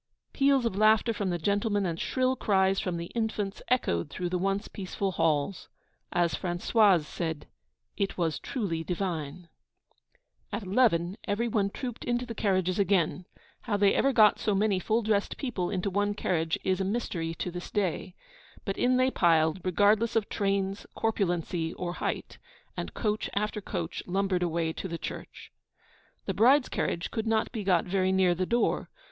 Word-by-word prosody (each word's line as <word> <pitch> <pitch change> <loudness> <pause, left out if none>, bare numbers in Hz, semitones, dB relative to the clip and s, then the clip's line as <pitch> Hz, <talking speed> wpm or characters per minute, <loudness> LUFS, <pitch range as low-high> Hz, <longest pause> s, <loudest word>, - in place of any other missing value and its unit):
Peals 275 -2 +3
of 230 - -1
laughter 215 +2 +4
from 200 -3 -2
the 175 - 0
gentlemen, 205 +3 0
and 170 -2 -2
shrill 260 0 +1
cries 195 -4 +2
from 180 -4 -2
the 170 0 -6
infants, 215 -3 -2
echoed 85 - +1
through 180 -1 -3
the 180 - 0
once 195 +2 -1
peaceful 195 0 -3
halls. 165 +1 0 0.4
As 175 -3 +1
Françoise 185 +2 +3
said 160 0 -4 0.5
'It 200 -1 -1
was 165 -3 0
truly 180 -10 -3
divine.' 170 -3 -3 1.0
At 230 - -3
eleven, 190 -3 +2
every 225 +4 0
one 205 -3 +1
trooped 245 +2 -6
into 240 0 -1
the 235 - -6
carriages 185 -3 0
again. 185 -3 +1 0.4
How 210 -4 0
they 200 -1 +4
ever 275 - +3
got 215 -4 +5
so 210 - 0
many 200 -1 +2
full 220 +5 0
dressed 210 -1 0
people 220 -10 -2
into 195 0 -2
one 205 +1 0
carriage 165 -5 0
is 190 0 +1
a - - +1
mystery 185 -6 -2
to 180 - -4
this 175 0 -7
day. 185 -2 -2 0.5
But 195 - -3
in 250 0 +3
they 255 +1 +3
piled, 165 -2 +3
regardless 205 +5 +3
of 220 -3 +1
trains, 195 0 -1
corpulency, 175 -6 -1
or 175 -1 -3
height; - - -3 0.4
and - - -5
coach 215 -1 -1
after 210 +1 -1
coach - - -4
lumbered 190 0 0
away 165 -2 0
to 190 - -5
the 170 -2 -4
church. - - -8 0.7
The - - -1
bride's 260 +4 +4
carriage 170 - -2
could 220 0 -3
not 220 0 +1
be 220 -4 -4
got 180 -3 +2
very 185 0 +1
near 190 -2 +3
the 185 +1 -2
door. 235 0 +1
195 Hz, 170 wpm, -28 LUFS, 175-215 Hz, 1.0 s, got